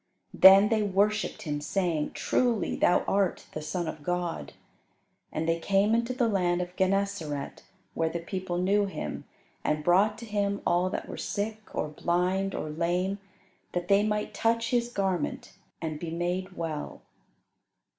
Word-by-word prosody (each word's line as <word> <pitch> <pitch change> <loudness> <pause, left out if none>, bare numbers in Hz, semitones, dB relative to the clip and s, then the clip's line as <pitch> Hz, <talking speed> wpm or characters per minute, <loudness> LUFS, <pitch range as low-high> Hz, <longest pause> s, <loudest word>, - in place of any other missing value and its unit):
Then 195 +2 +8
they 220 -1 +2
worshipped 210 +2 +1
him, 145 -3 -3
saying, 165 -1 -1
"Truly 235 -7 +1
Thou 180 - +3
art 195 -2 +1
the 155 - -4
Son 170 +2 -3
of 155 - -5
God." 175 +1 -3 0.8
And 160 +1 -2
they 165 0 +1
came 195 +5 +2
into 235 +2 +1
the 250 -2 +1
land 180 -4 +1
of 180 0 -4
Gennesaret, 190 -7 -1 0.3
where 165 0 0
the 170 - -3
people 180 +1 -4
knew 200 +3 +2
Him 195 - -5 0.4
and 150 0 0
brought 195 +6 +4
to 235 - -8
Him 200 -2 -1
all 180 +1 +2
that - - -4
were - - -7
sick, 215 +1 -3
or - - -1
blind, 180 +5 0
or 155 - -4
lame, 175 +5 -1 0.5
that 175 0 -3
they 200 0 +6
might 210 0 -1
touch 230 0 +1
His 240 -1 +1
garment 195 -5 -2 0.3
and 155 -2 -3
be 170 - -4
made 175 +3 -2
well. 160 -3 -5
185 Hz, 155 wpm, -28 LUFS, 170-205 Hz, 0.8 s, Then